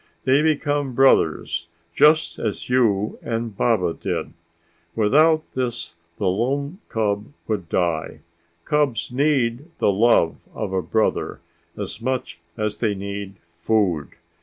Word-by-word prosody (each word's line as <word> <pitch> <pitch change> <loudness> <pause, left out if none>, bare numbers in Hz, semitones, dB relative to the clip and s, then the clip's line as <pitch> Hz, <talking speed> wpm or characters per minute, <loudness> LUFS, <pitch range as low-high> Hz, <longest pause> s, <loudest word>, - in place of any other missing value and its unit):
They 135 +3 +4
become 145 -4 0
brothers 135 -9 +3 0.3
just 155 - +4
as 110 +1 -3
you 110 -5 +2
and 115 -2 -3
Baba 95 -7 +2
did. - - -4 0.6
Without 155 +9 +3
this 125 -2 -3 0.2
the 100 - -2
lone 140 - -1
cub 105 -2 0 0.2
would 100 -7 -2
die. 85 -3 -1 0.4
Cubs 145 -6 0
need 135 -1 +1
the - - +3
love 100 -5 +3 0.2
of 100 -3 -3
a 95 - +1
brother 110 +4 0 0.4
as 105 +2 -5
much 130 -8 -3 0.2
as 105 -1 -2
they 105 -4 +1
need 100 0 -6
food. 85 - 0
115 Hz, 120 wpm, -22 LUFS, 100-135 Hz, 0.6 s, They